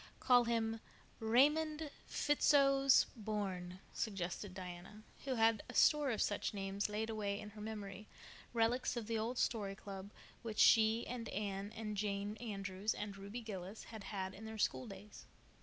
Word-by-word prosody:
"Call 245 -2 +5
him 225 -1 0 0.4
Raymond 300 +6 +3 0.2
Fitzosborne," 235 -10 +3 0.2
suggested 190 -1 -3
Diana, 185 +3 -8 0.2
who 265 -2 0
had 225 -2 +4
a - - -8
store 300 -2 +5
of 225 - +1
such 205 0 -1
names 195 +1 -2
laid 220 +2 -2
away 205 -2 -2
in 210 - -8
her 210 0 -10
memory, 210 -1 -6 0.4
relics 240 +2 +1
of 235 - -3
the 225 0 -1
old 235 +3 -2
"Story 205 -6 0
Club," 195 -1 -8 0.3
which 225 -3 -5
she 225 +1 +6
and 235 -2 -5
Anne 200 0 -3
and 215 -1 -4
Jane 205 0 -2
Andrews 200 -2 -2
and 205 -1 -5
Ruby 200 +5 -6
Gillis 200 -2 -6
had 220 -3 -9
had 190 -2 -3
in 215 +3 -9
their 220 0 -6
schooldays. 205 -2 -3
215 Hz, 150 wpm, -37 LUFS, 200-230 Hz, 0.4 s, she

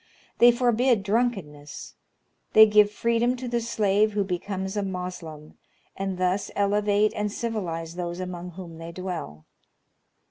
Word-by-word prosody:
They 240 0 +8
forbid 240 -2 +2
drunkenness. 195 -10 -2 0.6
They 220 0 +10
give 210 -1 +5
freedom 235 +3 +1
to 255 0 -6
the 240 0 -1
slave 215 -2 +1
who 205 -1 +1
becomes 190 +1 -4
a 205 - 0
Moslem, 180 -5 -6 0.4
and 195 -1 -3
thus 185 +2 0
elevate 205 +1 +2
and 210 0 -2
civilize 175 -8 -4
those 175 0 -5
among 180 -1 -6
whom 170 -2 -10
they 165 +1 -7
dwell. 170 - -6
195 Hz, 135 wpm, -25 LUFS, 180-215 Hz, 0.6 s, They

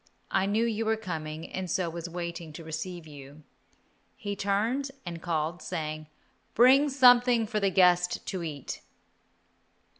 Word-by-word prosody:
I 195 0 +2
knew 215 +3 +2
you 225 -1 -1
were 220 0 +2
coming, 160 -6 -5
and 185 -1 -3
so 180 +1 0
was 170 +1 -5
waiting 170 -1 -5
to 165 - -9
receive 160 +2 -5
you." 145 0 -12 0.7
He 205 -5 -4
turned 220 +8 0 0.2
and 170 -2 -6
called, 165 0 -2
saying, 155 -1 -4 0.5
"Bring 265 +5 +6
something 245 -3 +5
for 215 0 -2
the 200 -1 +2
guest 180 -1 +3
to 185 - -4
eat." 150 -5 -6
180 Hz, 145 wpm, -28 LUFS, 160-220 Hz, 0.7 s, Bring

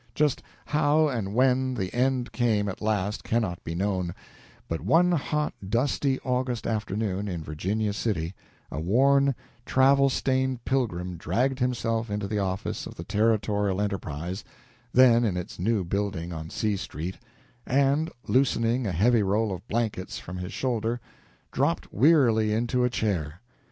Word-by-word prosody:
Just 150 -3 +2 0.2
how 150 +1 +3
and 110 -6 -3
when 130 0 +3
the 95 -5 -3
end 125 0 +1
came 110 -4 +1
at 95 - -5
last 105 -1 -1
cannot 110 -7 -1
be 80 - -4
known; 95 -2 -1 0.5
but 80 - -3
one 165 - +4
hot, 150 -2 0 0.2
dusty 130 +3 +1
August 125 -2 -1
afternoon, 105 -2 -2
in 85 -5 -4
Virginia 100 +8 -2
City, 95 -5 -2 0.4
a 70 - -3
worn, 135 - +3 0.3
travel 135 +2 +4
stained 130 -2 0
pilgrim 90 -10 -1
dragged 125 - 0
himself 115 -3 0
into 105 -1 -2
the 105 +1 -1
office 95 0 -2
of - - -10
the 85 - -7
"Territorial 105 -1 +1
Enterprise," 95 -2 -3 0.5
then 120 -2 +6
in 100 -6 0
its 90 - -6
new 105 +1 +1
building 90 -2 -2
on 80 0 -6
C 105 +2 -1
Street, 90 -1 -5 0.5
and, 140 +4 +2 0.2
loosening 120 -2 +2
a - - -1
heavy 110 +7 +3
roll 105 +2 +1
of 95 +5 -8
blankets 110 -5 -2
from 90 +1 -7
his 90 +1 -5
shoulder, 120 -2 -1 0.5
dropped - - -1
wearily 120 - +4
into 120 +3 +1
a 125 - +3
chair. 90 -9 -2
110 Hz, 145 wpm, -27 LUFS, 95-130 Hz, 0.5 s, then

